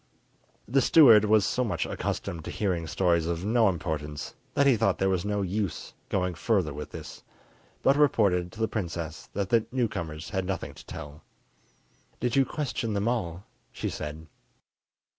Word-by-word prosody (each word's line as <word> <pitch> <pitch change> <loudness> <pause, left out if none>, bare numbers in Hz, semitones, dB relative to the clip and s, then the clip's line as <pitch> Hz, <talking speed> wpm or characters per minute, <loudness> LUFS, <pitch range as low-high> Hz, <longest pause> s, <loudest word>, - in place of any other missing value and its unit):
The 135 +5 +3
steward 115 -7 +7
was 105 -1 +4
so 125 +4 0
much 115 - -1
accustomed 85 -2 -3
to - - -5
hearing 90 -6 -1
stories 85 0 +1
of 85 +2 -2
no 110 -1 +4
importance 75 -4 -4 0.2
that 140 -1 +4
he 135 -3 +6
thought 100 -3 +1
there 95 0 +1
was 90 -2 0
no 105 -1 0
use 95 0 -3 0.2
going 90 -1 0
further 90 -4 0
with 75 0 -6
this, - - -9 0.6
but 135 - +5
reported 100 -12 +3
to 110 - -12
the 110 - +2
princess 85 -7 -5
that 100 -1 -2
the 115 -2 +3
newcomers 85 -11 -3
had 95 -2 -1
nothing 95 -2 -3
to - - -14
tell. 75 +2 -8 1.0
"Did 125 -1 0
you 135 -1 +5
question 125 -6 -3
them 100 +2 0
all?" 95 -7 -2 0.3
she - - -4
said. 75 +2 -6
95 Hz, 165 wpm, -28 LUFS, 85-115 Hz, 1.0 s, steward